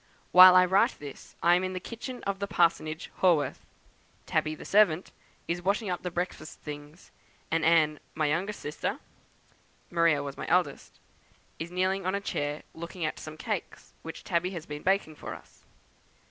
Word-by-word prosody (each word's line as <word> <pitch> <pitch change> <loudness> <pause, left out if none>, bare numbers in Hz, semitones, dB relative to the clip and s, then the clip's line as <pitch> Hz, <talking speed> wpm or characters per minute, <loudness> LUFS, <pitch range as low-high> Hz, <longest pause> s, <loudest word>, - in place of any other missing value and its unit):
While 185 0 +10
I 180 0 +7
write 190 +2 +3
this 145 -2 -10
I 175 - +6
am 180 +1 +3
in 185 0 -2
the 185 - -3
kitchen 240 +5 -7
of 200 -1 -2
the 200 - -2
Parsonage, 165 -3 +1
Haworth; 170 -6 +2 0.6
Tabby, 155 0 0
the - - -11
servant, 195 -4 +3 0.4
is 170 +1 -2
washing 200 +2 0
up 180 - -3
the 180 - -3
breakfast 175 -3 -5
things, 150 +3 -9 0.4
and 165 0 +1
Anne, 155 -2 +4 0.2
my 155 - +1
youngest 180 +8 -1
sister 150 - -3 0.9
(Maria 165 -4 +3
was 140 -1 -6
my - - -5
eldest), - - 0 0.6
is 165 - -4
kneeling 185 +1 0
on 190 - +1
a - - 0
chair, 145 -6 -3
looking 170 +1 -5
at 155 - -3
some 155 0 -8
cakes 210 +1 -5
which 165 - -8
Tabby 180 -1 0
has 170 -4 -7
been 150 0 -7
baking 190 -5 0
for - - -6
us. - - -17
175 Hz, 175 wpm, -28 LUFS, 155-185 Hz, 0.9 s, While